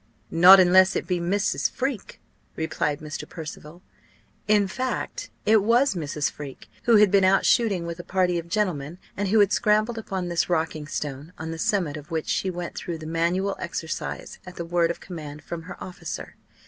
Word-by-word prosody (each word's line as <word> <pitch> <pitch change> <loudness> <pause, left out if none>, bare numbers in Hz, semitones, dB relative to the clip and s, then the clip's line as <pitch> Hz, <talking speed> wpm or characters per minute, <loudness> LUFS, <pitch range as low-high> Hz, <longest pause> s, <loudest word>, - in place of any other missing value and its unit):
"Not 180 +4 +9
unless 185 +1 +6
it - - -1
be 180 -2 -1
Mrs. 195 +4 0
Freke," 260 -5 -4 0.4
replied 155 -2 -2
Mr. 150 -1 -7
Percival. 160 +1 -9 0.6
In 205 -1 +4
fact 260 - -4 0.2
it 215 0 +5
was 235 +5 +3
Mrs. 150 -4 -2
Freke, 140 -3 -9 0.2
who 235 - +5
had 210 -2 +6
been 200 -1 +4
out 190 +1 +4
shooting 200 -8 +2
with 170 0 -6
a - - -6
party 180 -2 +1
of 170 0 -9
gentlemen, 170 -6 -1 0.2
and 200 0 -1
who 215 +3 +3
had 205 0 +3
scrambled 215 +2 +2
upon 190 -4 -4
this 170 0 0
rocking 160 -3 -1
stone, 150 +2 -5
on 160 +1 -5
the 165 - -6
summit 170 -6 0
of 150 -1 -11
which 160 -1 -3
she 190 - 0
went 175 -1 -5
through 170 -2 -4
the 155 - -9
manual 170 +5 0
exercise 165 -2 -5
at 180 -1 -11
the 170 - -5
word 170 0 +1
of 170 - -4
command 150 -4 -8
from 170 -1 -6
her - - -7
officer. 175 -3 -7
175 Hz, 185 wpm, -25 LUFS, 160-200 Hz, 0.6 s, Not